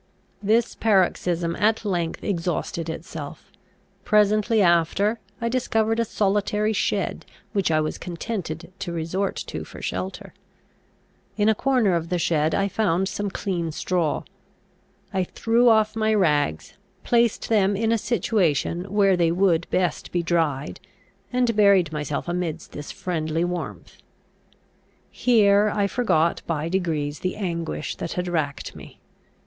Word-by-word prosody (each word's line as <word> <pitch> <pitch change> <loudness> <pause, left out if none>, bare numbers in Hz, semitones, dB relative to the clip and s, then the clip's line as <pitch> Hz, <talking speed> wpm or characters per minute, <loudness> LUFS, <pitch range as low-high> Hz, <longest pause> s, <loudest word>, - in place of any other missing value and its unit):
This 220 +3 +2
paroxysm 180 -5 +1
at 220 +2 +1
length 175 -4 -2
exhausted 170 -3 -2
itself. 155 -2 -7 0.5
Presently 215 +2 +3
after, 185 +5 +3 0.2
I 230 - -1
discovered 225 -2 +1
a 230 - +2
solitary 210 +1 0
shed, - - -1 0.3
which 195 -5 +1
I 155 -1 +3
was 155 - -3
contented 175 -2 -5
to 195 -3 -4
resort 170 +4 -2
to - - -5
for - - -11
shelter. - - -5 1.0
In 210 0 +3
a - - +5
corner 245 -4 +2
of 170 -1 -1
the 180 - 0
shed 160 -2 +1
I 200 0 +1
found 190 -2 +1
some 205 0 -3
clean 175 -4 -2
straw. 165 -1 -1 0.9
I 190 -1 +1
threw 230 +6 +2
off 220 -1 +3
my 220 0 +2
rags, 150 - +1 0.3
placed 235 -2 +2
them 205 -3 +3
in 220 +2 +1
a 230 - +3
situation 180 - 0
where 200 -2 +4
they 170 -2 +2
would 170 -2 +2
best 180 -4 -1
be 175 -1 0
dried, 160 -5 -1 0.5
and 245 -2 +1
buried 200 -6 +5
myself 150 0 -3
amidst 175 -2 -3
this 145 - -7
friendly 165 -2 -2
warmth. 175 0 -5 1.1
Here 210 -3 +4
I 205 -1 +1
forgot 180 -7 +1
by 160 -1 -1
degrees 160 -5 -1
the 185 - -2
anguish 170 -5 -3
that 165 - -4
had 180 0 -2
racked 155 -5 -2
me. - - -12
185 Hz, 135 wpm, -24 LUFS, 165-210 Hz, 1.1 s, a